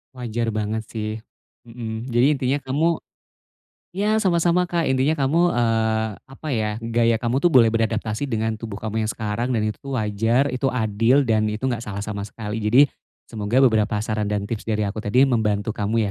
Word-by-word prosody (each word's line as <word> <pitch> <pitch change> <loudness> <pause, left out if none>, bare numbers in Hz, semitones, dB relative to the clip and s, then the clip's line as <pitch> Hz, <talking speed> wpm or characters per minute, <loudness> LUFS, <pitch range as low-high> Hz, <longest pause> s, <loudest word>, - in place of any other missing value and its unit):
Wajar 115 -2 -2
banget 110 +1 -2
sih, 110 -1 -3 0.5
mmm. 115 -1 -6
Jadi 120 +2 +4
intinya 130 +1 0
kamu 160 +5 +1 1.0
ya 210 +3 +1
sama-sama 180 -2 +2
Kak, 170 -1 0
intinya 135 +4 +2
kamu, 140 +2 +1 0.2
eee, 110 -2 +1 0.2
apa 135 +4 -9
ya, 110 -5 0
gaya 115 0 +2
kamu 120 +2 +1
tuh 175 +5 +3
boleh 115 -3 +7
beradaptasi 110 +2 -1
dengan 110 -3 -1
tubuh 110 -3 -7
kamu 110 0 -1
yang - - -1
sekarang, 115 +4 -2
dan 110 - +1
itu 120 +6 -4
wajar, 115 +4 +1
itu 130 +1 -1
adil, 115 +2 +2
dan 110 -4 +1
itu 105 +3 -3
enggak 120 -1 -4
salah 100 -1 -4
sama 100 -1 -4
sekali. 105 +1 -6
Jadi, 110 +5 +4 0.5
semoga 110 +4 +1
beberapa 110 -3 +2
saran 110 -1 -2
dan 105 -1 -1
tips 110 0 -5
dari 110 -1 0
aku 100 +2 -4
tadi 110 +4 +2
membantu 110 -5 +1
kamu 105 0 0
115 Hz, 175 wpm, -22 LUFS, 110-130 Hz, 1.0 s, boleh